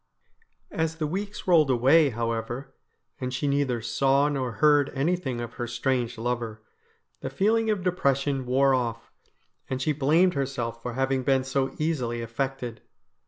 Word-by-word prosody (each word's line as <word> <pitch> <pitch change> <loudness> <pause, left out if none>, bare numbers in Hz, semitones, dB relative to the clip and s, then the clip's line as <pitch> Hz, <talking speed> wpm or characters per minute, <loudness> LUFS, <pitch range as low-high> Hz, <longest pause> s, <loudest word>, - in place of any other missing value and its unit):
As 160 0 -1
the 160 -1 -2
weeks 200 +6 -4
rolled 165 -6 +5
away, 135 +5 +5
however, 115 +3 -3 0.5
and 130 -1 -3
she 125 +3 -2
neither 140 -5 0
saw 135 +4 +2
nor 130 -4 -2
heard 145 +1 +4
anything 140 -3 -1
of 120 -1 -5
her 120 -1 -4
strange 120 -1 -1
lover, 115 -2 -3 0.6
the - - -4
feel 210 +4 +2
ing 225 -1 +1
of 205 -4 0
depression 140 -7 0
wore 135 +2 +3
off, 115 -2 -2 0.6
and 130 - -2
she 140 +4 +1
blamed 155 +6 +3
herself 125 -4 -3
for 125 0 -5
having 135 +1 0
been 135 0 +2
so 135 0 -1
easily 125 -7 -1
affected. 125 0 -4
135 Hz, 155 wpm, -26 LUFS, 120-150 Hz, 0.6 s, rolled